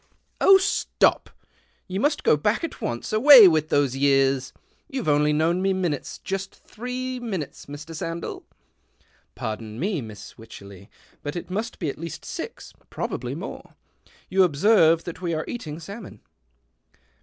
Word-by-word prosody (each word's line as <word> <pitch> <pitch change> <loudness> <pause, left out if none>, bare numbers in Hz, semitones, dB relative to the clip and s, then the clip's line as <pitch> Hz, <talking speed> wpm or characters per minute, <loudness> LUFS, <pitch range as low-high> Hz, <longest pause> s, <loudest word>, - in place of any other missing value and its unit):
" - - -39
Oh, 390 - +8
stop! 380 - +1 0.6
you 190 0 -3
must 290 +5 +1
go - - +5
back 210 - 0
at 330 - -5
once. 120 - -4
Away 240 -1 +10
with 155 -3 +2
those 140 -3 +2
years! 135 -1 +2 0.4
You've 260 - -4
only 150 0 +3
known 165 +4 +1
me 195 0 +2
minutes, 175 -7 -3
just 195 0 -5
three 250 +2 -6
minutes, 195 - -5
Mr. 145 +3 -9
Sandell." 165 +1 -5 0.5
" - - -38
Pardon 110 0 -5
me. 185 -3 -1
Miss 105 -3 -11
Wycherley, 100 -3 -12 0.3
but 145 +2 -5
it 175 +1 -6
must 220 +4 -3
be 165 - -3
at 140 - -4
least 165 -2 -7
six - - -7
— - - -33
probably - - -4
more. - - -8 0.5
You 190 +1 +2
observe 165 0 +4
that 175 +1 -8
we 170 -2 -1
are 155 - -3
eating 160 -10 -6
salmon." 200 +5 -10
165 Hz, 155 wpm, -24 LUFS, 145-205 Hz, 0.6 s, Away